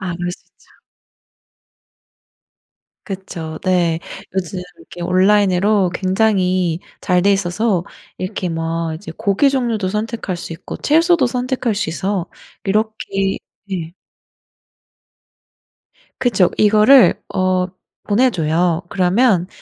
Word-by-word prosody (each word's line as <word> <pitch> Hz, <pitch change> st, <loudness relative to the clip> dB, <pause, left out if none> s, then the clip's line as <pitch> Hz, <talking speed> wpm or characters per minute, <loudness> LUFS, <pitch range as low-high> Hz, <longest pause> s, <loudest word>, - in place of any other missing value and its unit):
아 180 Hz, -3 st, -3 dB
그럴 175 Hz, 0 st, -3 dB
수 -, -, -12 dB
있죠. -, -, -28 dB, 2.4 s
그쵸 175 Hz, -5 st, -6 dB
네. 175 Hz, -3 st, +2 dB, 0.4 s
요즘 185 Hz, 0 st, -3 dB, 0.2 s
이렇게 165 Hz, +1 st, -13 dB
온라인으로 190 Hz, +1 st, +3 dB
굉장히 185 Hz, -3 st, +1 dB, 0.2 s
잘 180 Hz, -1 st, +2 dB
돼 200 Hz, +2 st, +4 dB
있어서 195 Hz, 0 st, 0 dB, 0.3 s
이렇게 185 Hz, -1 st, -3 dB
막 165 Hz, 0 st, -2 dB
이제 160 Hz, 0 st, -8 dB
고기 200 Hz, +8 st, +2 dB
종류도 235 Hz, -7 st, -1 dB
선택할 210 Hz, -2 st, -3 dB
수 170 Hz, -, -7 dB
있고 165 Hz, -, -8 dB
채소도 330 Hz, -1 st, +3 dB
선택할 250 Hz, -2 st, -1 dB
수 200 Hz, -, -2 dB
있어 185 Hz, +3 st, -2 dB, 0.4 s
이렇게 195 Hz, -2 st, -1 dB, 0.3 s
예. 170 Hz, -3 st, -4 dB, 2.3 s
그쵸. 210 Hz, -8 st, +2 dB
이거를 215 Hz, +5 st, +6 dB, 0.2 s
어 185 Hz, -1 st, +1 dB, 0.4 s
보내줘요. 175 Hz, -7 st, +1 dB
그러면 190 Hz, 0 st, +2 dB
190 Hz, 215 characters per minute, -18 LUFS, 175-215 Hz, 2.4 s, 이거를